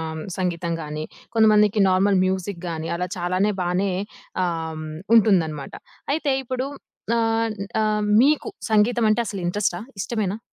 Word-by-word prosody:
హ్మ్, 155 - -5 0.2
సంగీతం 170 -2 -1
గానీ, 150 0 -5 0.3
కొంతమందికి 210 -1 +5
నార్మల్ 190 +1 +3
మ్యూజిక్ 185 -1 -2
గానీ, 160 0 -4
అలా 180 - -2
చాలానే 185 +4 +1
బానే 180 +2 0 0.5
ఆహ్, 160 -2 -3 0.3
ఉంటుందన్నమాట. 170 -10 +2 0.4
అయితే 295 -3 0
ఇప్పుడు 255 +1 -3 0.5
ఆన్ 225 -1 +1 0.3
ఆహ్, 210 0 +1 0.2
మీకు 300 +7 +2 0.2
సంగీతమంటే 220 +1 +3
అసలు 195 -3 -4
ఇంట్రస్టా? 180 -1 0 0.2
ఇష్టమేనా? 210 -1 -2
195 Hz, 120 wpm, -23 LUFS, 175-215 Hz, 0.5 s, కొంతమందికి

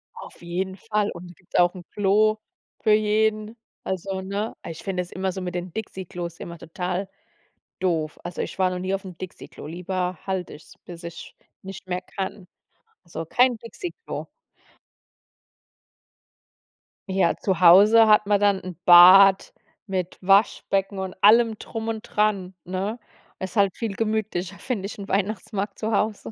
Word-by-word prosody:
Auf - - -12
jeden 185 +2 -3
Fall. 210 +1 -1
Und 175 0 -10
gibt 180 - -6
auch 175 +1 +4
'n 180 - -9
Klo 210 +2 +2 0.4
für 215 - +2
jeden, 215 +1 +1 0.3
also, 190 +1 -3
ne? 200 +3 -4
Ah, - - -8
ich 165 - -8
find 190 -2 -3
das 180 0 -4
immer 190 0 -2
so 190 0 -6
mit 180 -1 -5
den 175 -1 -5
Dixie-Klos 180 -5 -6
immer 170 0 -8
total 180 +3 -4 0.7
doof. 160 -5 -1
Also, 175 0 -5
ich - - -6
war 185 - +3
noch 180 0 -4
nie 185 +1 -2
auf 195 0 -2
'm 180 -3 -9
Dixie-Klo. 185 -4 -9
Lieber 180 +1 -3
halt 190 -2 -3
ich 150 - -11
es, - - -17
bis 170 -1 -10
ich 170 -1 -9 0.3
nicht 190 0 -10
mehr 180 0 -2
kann. 190 0 -6 0.6
Also 165 -1 -6
kein 245 +7 +3
Dixie-Klo. 355 - -7 2.8
Ja, 190 -3 +2
zu 185 -3 -1
Hause 205 +6 +7
hat 210 -1 +5
man 205 -1 +3
dann 200 -1 +2
'n 185 -2 -8
Bad 190 +2 +8 0.3
mit 185 -2 -3
Waschbecken 195 0 +2
und 190 -1 -4
allem 225 +1 +5
drum 225 -1 -5
und 220 -1 -3
dran, 200 -5 -1
ne? 190 +5 -3 0.4
Ist 190 +3 -6
halt 200 -2 +3
viel 225 -4 -3
gemütlicher, 215 -4 -2
finde 220 -7 -3
ich, 200 - -7
'n 200 -1 -8
Weihnachtsmarkt 200 0 -2
zu 220 +1 -2
Hause. 210 +1 -1
190 Hz, 160 wpm, -24 LUFS, 180-210 Hz, 2.8 s, Bad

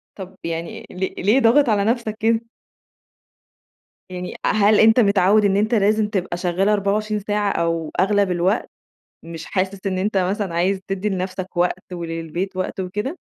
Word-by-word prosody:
طب 190 -1 -9
يعني 165 0 -5
ليه 185 +1 -3
ليه 220 +7 +4
ضاغط 250 +3 +4
على 205 -2 +2
نفسك 225 -2 -1
كده؟ 225 +1 +2 1.7
يعني 180 0 -6
هل 210 0 +4
أنت 225 +2 +6
متعود 200 0 +4
إن 195 0 +2
أنت 220 +3 +1
لازم 210 0 +2
تبقى 185 -4 -3
شغال 180 +3 0
24 210 +1 0
ساعة 205 0 0
أو 165 -2 -1
أغلب 200 0 +2
الوقت، 180 +6 0 0.5
مش 165 -1 -8
حاسس 190 +1 -2
إن 185 -1 -1
أنت 200 +1 -1
مثلًا 190 -1 -1
عايز 190 +3 +1
تدي 195 +2 -2
لنفسك 185 -1 -4
وقت 180 +1 -1
وللبيت 170 +2 -4
وقت 185 +1 -3
وكده؟ 210 - -4
195 Hz, 155 wpm, -21 LUFS, 180-210 Hz, 1.7 s, أنت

